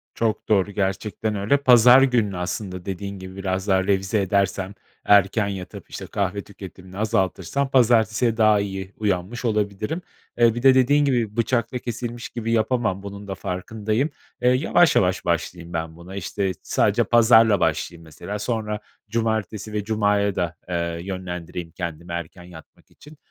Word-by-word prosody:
Çok 110 Hz, -1 st, -1 dB
doğru, 100 Hz, -1 st, +2 dB
gerçekten 105 Hz, +2 st, -2 dB
öyle. 100 Hz, +8 st, +2 dB
Pazar 125 Hz, -1 st, +7 dB
gününü 115 Hz, -8 st, +2 dB
aslında 90 Hz, 0 st, -4 dB
dediğin 100 Hz, 0 st, -5 dB
gibi 95 Hz, 0 st, -9 dB
biraz 95 Hz, 0 st, -3 dB
daha 95 Hz, -1 st, +3 dB
revize 100 Hz, +1 st, +1 dB
edersem, 95 Hz, 0 st, 0 dB, 0.3 s
erken 100 Hz, +1 st, +4 dB
yatıp, 95 Hz, -2 st, -7 dB
işte, -, -, -7 dB
kahve 100 Hz, 0 st, -2 dB
tüketimini 95 Hz, -1 st, -12 dB
azaltırsam, 105 Hz, +5 st, 0 dB
pazartesiye 115 Hz, -2 st, +3 dB
daha 110 Hz, -2 st, +5 dB
iyi 95 Hz, -1 st, -5 dB
uyanmış 105 Hz, +4 st, -2 dB
olabilirim. 105 Hz, -, -1 dB, 0.4 s
Eee, 115 Hz, -1 st, +4 dB
bir 120 Hz, -, -4 dB
de 135 Hz, -1 st, +8 dB
dediğin 145 Hz, +3 st, +4 dB
gibi 120 Hz, -5 st, 0 dB
bıçakla 120 Hz, +1 st, 0 dB
kesilmiş 120 Hz, 0 st, -5 dB
gibi 115 Hz, -1 st, -4 dB
yapamam, 110 Hz, -4 st, 0 dB
bunun 100 Hz, 0 st, -8 dB
da 95 Hz, -, -4 dB
farkındayım. 110 Hz, -, -2 dB, 0.3 s
Eee, 125 Hz, -, +4 dB
yavaş 160 Hz, +6 st, +3 dB
yavaş 90 Hz, -1 st, +2 dB
başlayayım 85 Hz, 0 st, -2 dB
ben 80 Hz, 0 st, -3 dB
buna. 85 Hz, +3 st, -11 dB
İşte, 100 Hz, 0 st, -2 dB
sadece 115 Hz, +4 st, +2 dB
pazarla 110 Hz, -2 st, +5 dB
başlayayım, 85 Hz, +1 st, -1 dB
mesela, 85 Hz, +6 st, -7 dB
sonra 105 Hz, -1 st, -2 dB, 0.3 s
cumartesi 110 Hz, -2 st, -2 dB
ve 105 Hz, -1 st, -1 dB
cumaya 105 Hz, -2 st, +1 dB
da, 85 Hz, -1 st, -2 dB
eee, 85 Hz, -1 st, -2 dB
yönlendireyim 90 Hz, -2 st, -6 dB
kendimi 85 Hz, -1 st, -6 dB
erken 85 Hz, +1 st, -6 dB
yatmak 85 Hz, -3 st, -15 dB
için. 150 Hz, 0 st, -16 dB
100 Hz, 150 wpm, -23 LUFS, 95-115 Hz, 0.4 s, de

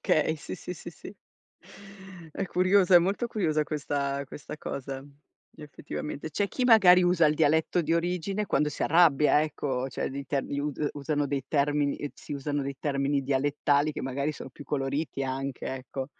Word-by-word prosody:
Okay, 155 Hz, +1 st, +2 dB
sì, 150 Hz, -, -7 dB
sì, 180 Hz, 0 st, -7 dB
sì, 175 Hz, -, -9 dB
sì. 175 Hz, -, -11 dB, 1.2 s
È 195 Hz, -, -2 dB
curiosa, 185 Hz, +1 st, +3 dB
è -, -, +11 dB
molto 195 Hz, +7 st, 0 dB
curiosa 165 Hz, -9 st, 0 dB
questa 140 Hz, -2 st, -2 dB
questa 145 Hz, +2 st, -9 dB
cosa 135 Hz, -2 st, -6 dB, 0.5 s
effettivamente. 150 Hz, 0 st, -7 dB
C'è 200 Hz, +7 st, -1 dB
chi 255 Hz, -, -2 dB
magari 195 Hz, -7 st, +7 dB
usa 175 Hz, -2 st, +4 dB
il 150 Hz, -, +2 dB
dialetto 160 Hz, +3 st, +2 dB
di 160 Hz, +1 st, -1 dB
origine 180 Hz, +4 st, -1 dB
quando 150 Hz, -4 st, +1 dB
si -, -, -5 dB
arrabbia, 155 Hz, -2 st, +4 dB
ecco, 135 Hz, -4 st, -2 dB
cioè -, -, -3 dB
dei 140 Hz, +1 st, -6 dB
term 135 Hz, 0 st, -2 dB
us 145 Hz, +1 st, -2 dB
usano 145 Hz, 0 st, -1 dB
dei 140 Hz, -2 st, -2 dB
termini 145 Hz, 0 st, 0 dB
si -, -, -9 dB
usano 145 Hz, 0 st, -2 dB
dei 140 Hz, 0 st, -4 dB
termini 140 Hz, -1 st, 0 dB
dialettali 145 Hz, +2 st, +1 dB
che -, -, -5 dB
magari 140 Hz, +3 st, -2 dB
sono 135 Hz, -, -9 dB
più 145 Hz, +3 st, -12 dB
coloriti 140 Hz, +1 st, -2 dB
anche, 135 Hz, 0 st, -4 dB
ecco. 130 Hz, 0 st, -5 dB
145 Hz, 165 wpm, -28 LUFS, 140-165 Hz, 1.2 s, è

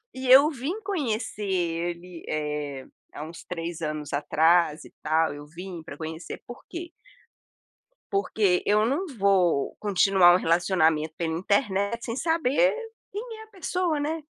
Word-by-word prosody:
E 260 Hz, 0 st, -4 dB
eu 280 Hz, +4 st, +9 dB
vim 315 Hz, -, -4 dB
conhecer 240 Hz, -, -2 dB
ele, 175 Hz, -1 st, -2 dB
eh, 150 Hz, -3 st, -3 dB, 0.3 s
há 150 Hz, -, -6 dB
uns 165 Hz, +2 st, -9 dB
3 170 Hz, -1 st, -5 dB
anos 150 Hz, -2 st, -4 dB
atrás 160 Hz, +2 st, +3 dB
e -, -, -14 dB
tal, 160 Hz, -1 st, +2 dB
eu 145 Hz, 0 st, -9 dB
vim 170 Hz, +1 st, -8 dB
pra 150 Hz, -3 st, -9 dB
conhecer 160 Hz, +2 st, -7 dB
por 245 Hz, -, -10 dB
quê? 340 Hz, 0 st, -7 dB, 1.2 s
Porque 195 Hz, -2 st, +2 dB
e -, -, -1 dB
eu 215 Hz, +1 st, +4 dB
não 305 Hz, +10 st, 0 dB
vou 185 Hz, -7 st, +2 dB
continuar 195 Hz, -3 st, +5 dB
um -, -, +5 dB
relacionamento 165 Hz, -3 st, +2 dB
pela 165 Hz, -1 st, -1 dB
internet 200 Hz, +2 st, 0 dB
sem 230 Hz, -, -3 dB
saber 325 Hz, -, +2 dB, 0.4 s
quem 445 Hz, +2 st, -6 dB
é 440 Hz, -, -9 dB
a -, -, -16 dB
pessoa, 360 Hz, -5 st, -1 dB
né? 315 Hz, +2 st, -2 dB
185 Hz, 150 wpm, -26 LUFS, 160-260 Hz, 1.2 s, eu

